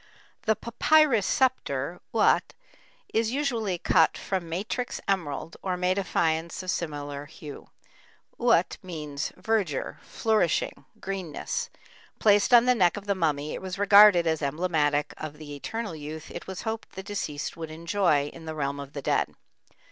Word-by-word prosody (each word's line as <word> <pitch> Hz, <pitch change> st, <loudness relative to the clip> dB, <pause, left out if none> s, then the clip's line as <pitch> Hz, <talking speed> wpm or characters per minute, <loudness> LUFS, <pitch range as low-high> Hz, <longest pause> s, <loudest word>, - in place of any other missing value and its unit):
The 220 Hz, -, +4 dB
"papyrus 235 Hz, -1 st, +3 dB
scepter," 175 Hz, -, 0 dB
uat, 225 Hz, -, +2 dB, 0.6 s
is 225 Hz, 0 st, +2 dB
usually 235 Hz, -9 st, -1 dB
cut 160 Hz, -1 st, +3 dB
from 185 Hz, -4 st, -3 dB
matrix 205 Hz, +8 st, -3 dB
emerald 165 Hz, -5 st, -2 dB
or 185 Hz, -2 st, -2 dB
made 185 Hz, +2 st, +1 dB
of 190 Hz, -, -4 dB
faience 165 Hz, +2 st, 0 dB
of 185 Hz, -, -1 dB
similar 145 Hz, -3 st, -4 dB
hue. 150 Hz, -1 st, -10 dB, 0.7 s
Uat -, -, +3 dB
means 150 Hz, -5 st, -5 dB
"verdure, 205 Hz, -11 st, -1 dB
flourishing, 215 Hz, -7 st, 0 dB
greenness"; 195 Hz, -, -4 dB, 0.5 s
placed 205 Hz, +1 st, +4 dB
on 240 Hz, -1 st, +8 dB
the 250 Hz, -, +5 dB
neck 185 Hz, -5 st, +3 dB
of 205 Hz, -, -7 dB
the 200 Hz, -, +1 dB
mummy 150 Hz, -5 st, -1 dB
it -, -, -5 dB
was 185 Hz, 0 st, -5 dB
regarded 200 Hz, -3 st, +7 dB
as 160 Hz, -1 st, 0 dB
emblematic 150 Hz, -1 st, 0 dB
of 155 Hz, -1 st, -7 dB
the 150 Hz, -1 st, -8 dB
eternal 215 Hz, +5 st, -4 dB
youth 155 Hz, +1 st, -8 dB
it -, -, -8 dB
was 190 Hz, -1 st, -6 dB
hoped 225 Hz, 0 st, -4 dB
the 190 Hz, -, -7 dB
deceased 190 Hz, -8 st, -4 dB
would 160 Hz, -1 st, -6 dB
enjoy 165 Hz, -2 st, +1 dB
in 165 Hz, -1 st, -11 dB
the 160 Hz, 0 st, -5 dB
realm 140 Hz, -1 st, -2 dB
of 140 Hz, 0 st, -8 dB
the 140 Hz, -, -6 dB
dead. -, -, 0 dB
175 Hz, 155 wpm, -27 LUFS, 150-205 Hz, 0.7 s, on